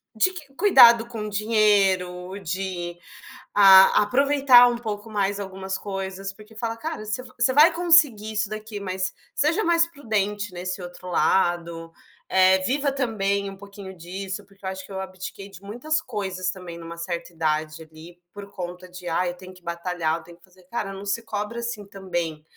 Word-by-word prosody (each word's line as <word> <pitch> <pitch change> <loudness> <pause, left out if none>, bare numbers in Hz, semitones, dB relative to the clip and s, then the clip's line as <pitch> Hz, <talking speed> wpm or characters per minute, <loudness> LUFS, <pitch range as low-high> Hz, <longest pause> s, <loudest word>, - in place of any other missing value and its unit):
de 295 +12 +3
que 300 -6 -11
cuidado 240 - +7
com 220 -3 -5
dinheiro, 200 -4 +1
de 180 -1 -4 0.6
a 190 -1 +8
aproveitar 270 +1 +6
um 240 - -2
pouco 220 -2 -6
mais 200 -1 0
algumas 190 -1 -5
coisas, 195 0 -5
porque 215 +2 -17
fala: 230 0 -3
"Cara, 310 -3 -5
você 215 +4 -3 0.2
você 235 +2 +3
vai 305 +5 +6
conseguir 315 -11 +4
isso 210 -1 -1
daqui, 215 0 -6
mas 185 -1 -3 0.2
seja 325 +9 +1
mais 335 0 +4
prudente 205 - -2
nesse 185 +1 -5
outro 180 +1 -10
lado, 170 -2 0 0.4
eh, 190 0 +5
viva 275 +8 0
também 200 -7 -1
um 195 - -10
pouquinho 200 -1 -10
disso". 190 +3 -6
Porque 195 0 -17
eu - - -1
acho 190 0 -7
que - - -15
eu 190 - -4
abdiquei 190 +1 -8
de 195 -1 -13
muitas 245 +10 -2
coisas 190 - -3
também 180 -2 -7
numa 170 0 -9
certa 170 0 -5
idade 155 0 -2
ali, 160 +2 -14 0.2
por 200 -1 -9
conta 180 -1 -7
de: 180 0 -10
"Ah, 180 +2 0
eu 175 - -3
tenho 185 +1 -12
que 185 - -18
batalhar. 170 -1 -2
Eu - - -12
tenho 170 -1 -15
que - - -32
fazer", 185 0 -23
cara, 210 -4 -3
não 195 +1 -8
se 205 +3 -1
cobra, 210 +2 -4
assim, 235 -3 -5
também 175 -6 -4
195 Hz, 180 wpm, -24 LUFS, 180-220 Hz, 0.6 s, a